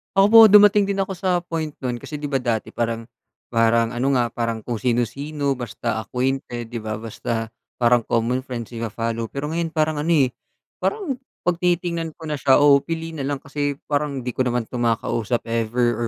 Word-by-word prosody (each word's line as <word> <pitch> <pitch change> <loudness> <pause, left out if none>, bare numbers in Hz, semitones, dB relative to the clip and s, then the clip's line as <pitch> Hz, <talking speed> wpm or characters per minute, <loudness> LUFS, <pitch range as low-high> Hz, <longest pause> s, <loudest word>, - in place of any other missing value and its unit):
Opo, 220 +3 +8
dumating 205 -1 +6
din 200 - -1
ako 190 - -7
sa 180 -1 0
point 160 -3 -4
no'n 120 -2 -2
kasi, 150 - -8
'di 145 -1 -5
ba, 135 - +2
dati 120 -3 -2
parang 115 -1 -2 0.5
parang 115 0 +3
ano 130 +3 0
nga, 120 -2 +1
parang 115 -2 -3
kung 120 -3 -3
sino-sino, 135 +4 -1
basta 115 -1 -3
acquainted, 125 0 -3
'di 120 - -3
ba, 110 0 -4
basta, 115 +1 -4 0.2
parang 120 0 +4
common 120 +2 +1
friends, 125 -3 -6
ipa-follow. 115 0 -3
Pero 140 +5 -5
ngayon, 165 0 -2
parang 155 -1 +1
ano, 150 - -2
eh, 130 -4 +3 0.5
parang 370 - -2 0.2
'pag 175 -1 0
tinitingnan 170 -2 -1
ko 165 - -14
na 150 - -2
siya, 135 0 +5
o 140 -1 +7
pili 165 +2 -5
na 145 -4 -4
lang, 140 -1 -3
kasi 145 0 -2 0.2
parang, 145 -2 -1
'di 125 - -2
ko 130 +2 0
naman 120 -1 0
'to 120 +2 -6
makausap 115 0 0
ever, 120 +1 0
130 Hz, 185 wpm, -22 LUFS, 115-155 Hz, 0.5 s, Opo